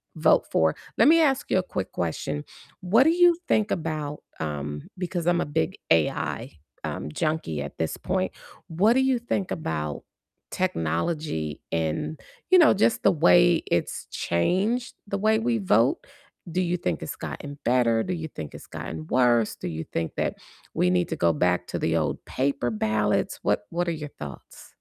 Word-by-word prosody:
vote - - +4
for. 80 -1 +3 0.2
Let 230 - +6
me 330 +2 +7
ask 275 -4 +2
you - - +4
a - - -1
quick - - -4
question, - - -3 0.4
what 200 +7 +5
do 320 - +4
you 350 0 +5
think 215 -1 +2
about, 155 -3 -3 0.2
um 75 -1 -4
because 175 -2 -3
I'm 175 0 +3
a - - -1
big 160 +4 -1
AI, 80 -2 +1 0.3
um, 70 - -4
junkie 155 - -1
at 70 -1 -7
this 80 -1 -2
point, 185 0 -1 0.4
what 190 +7 +3
do 260 - +3
you 265 -2 +2
think 200 -5 -2
about 75 - -3 0.5
technology 80 - -2
and, 85 - -2 0.3
you 370 - +7
know, 330 - +7
just 215 +3 +2
the 195 - +6
way 175 +1 +5
it's 85 - -1
changed 195 - 0
the 200 - -2
way 220 +1 +3
we 230 0 +1
vote? 130 - +2 0.4
Do 180 +3 0
you 180 0 0
think 90 - -2
it's - - -5
gotten 145 -1 -7
better, 120 -2 +3
do 185 - -2
you 160 -2 -5
think 80 - -8
it's - - -11
gotten 80 -1 -6
worse, 120 -3 +3
do - - -5
you 80 -2 -4
think 85 -1 -2
that - - -1 0.4
we 90 - +2
need 90 -1 +1
to - - -2
go 85 - +3
back 90 +3 +1
to - - -3
the 80 - 0
old 75 -2 -1
paper 135 -2 -1
ballots? 105 -1 0
What - - +1
what 175 +1 -1
are - - +1
your 150 -2 -5
thoughts? 70 -3 -10
150 Hz, 180 wpm, -26 LUFS, -, 0.5 s, me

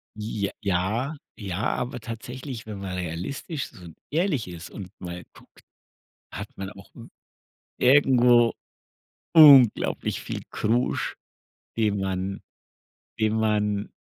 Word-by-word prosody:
J 105 -2 -3
ja, 105 - 0 0.2
ja, 100 -1 -4
aber 125 0 -4
tatsächlich, 120 +1 -7
wenn 105 -2 -7
man 95 -2 -5
realistisch 90 - -4
so 90 -2 -13 0.2
ehrlich 155 - 0
ist 85 -1 -9
und 95 -4 -8
mal 90 -1 -7
guckt, - - -20 0.7
hat - - -6
man 95 0 -5
auch 100 -1 -14
w 115 - -12 0.7
irgendwo 125 -3 +5 0.8
unglaublich 140 -8 +6
viel - - -5
Krusch, 120 +4 0 0.6
den 105 -3 +1
man 95 0 -3 0.8
den 110 0 +2
man 105 -2 0
110 Hz, 110 wpm, -25 LUFS, 95-125 Hz, 0.8 s, unglaublich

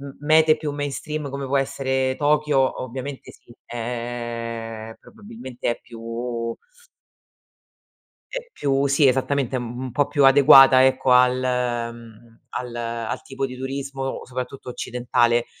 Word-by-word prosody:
m 140 0 -8
mete 155 +1 +4
più 150 -1 -4
mainstream 145 0 -4
come 140 0 -5
può 140 +1 0
essere 130 -1 -1
Tokyo, 150 -2 +2
ovviamente 130 +2 -7
sì, 120 - -19
ehm 120 -1 -5 0.3
probabilmente 215 - -7
è 120 - -3
più 115 0 -5 1.8
è - - -5
più 140 0 0
sì, 140 0 +4
esattamente, 130 0 0
mhmm, 120 -1 -6
un 130 - -4
po' 140 +4 +1
più 145 -2 +1
adeguata, 135 -1 +8
ecco, 130 0 +2
al 125 0 +5 0.6
mhmm, 115 0 -15
al 125 -1 -5
al 115 -1 -4
tipo 135 0 -5
di 130 -1 -5
turismo, 135 0 -4
soprattutto 130 +1 -7
occidentale. 120 -1 0
130 Hz, 125 wpm, -23 LUFS, 120-140 Hz, 1.8 s, adeguata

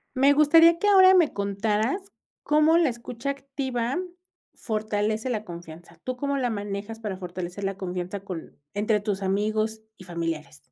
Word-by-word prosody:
Me 275 +2 +5
gustaría 330 +3 +6
que 415 - 0
ahora 380 -2 +7
me 340 -5 +4
contaras 215 - -1 0.3
cómo 305 +2 +4
la 335 -4 +4
escucha 240 +2 -4
activa 270 -2 -3 0.6
fortalece 215 +1 -2
la 215 -3 -2
confianza. 170 -2 -11
¿Tú 255 0 -4
cómo 280 +1 -1
la 250 -3 0
manejas 205 +1 -5
para 210 -4 -4
fortalecer 180 +1 -6
la 195 0 -2
confianza 180 +1 -4
con 185 -4 -8 0.2
entre 210 +1 +2
tus 200 -2 -3
amigos 215 +3 0 0.2
y 185 - -12
familiares? 165 -4 -4
215 Hz, 150 wpm, -26 LUFS, 195-275 Hz, 0.6 s, ahora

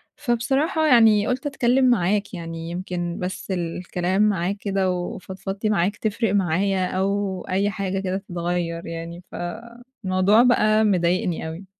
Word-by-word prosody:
فبصراحة 280 +5 0
يعني، 225 -5 +5
قُلت 255 +4 -2
أتكلِّم 260 -1 +2
معاك 205 -1 +1
يعني، 165 -2 -6
يمكن 175 -1 -4
بس 185 +2 -5
الكلام 180 +2 -1
معاك 200 -2 +1
كده 195 -2 0
وفضفضتي 190 +3 -4
معاك 200 0 +1
تفرِق 215 -1 -1
معايا 190 +1 +1
أو 195 0 -1
أي 195 +2 +1
حاجة 195 -1 -2
كده 190 0 -2
تتغيَّر 175 -2 -3
يعني، 165 +1 -7
ف - - -9 0.7
الموضوع 185 +5 +4
بقى 215 -3 +4
مضايقني 180 -4 +1
أوي. 165 +4 -7
190 Hz, 130 wpm, -23 LUFS, 175-210 Hz, 0.7 s, يعني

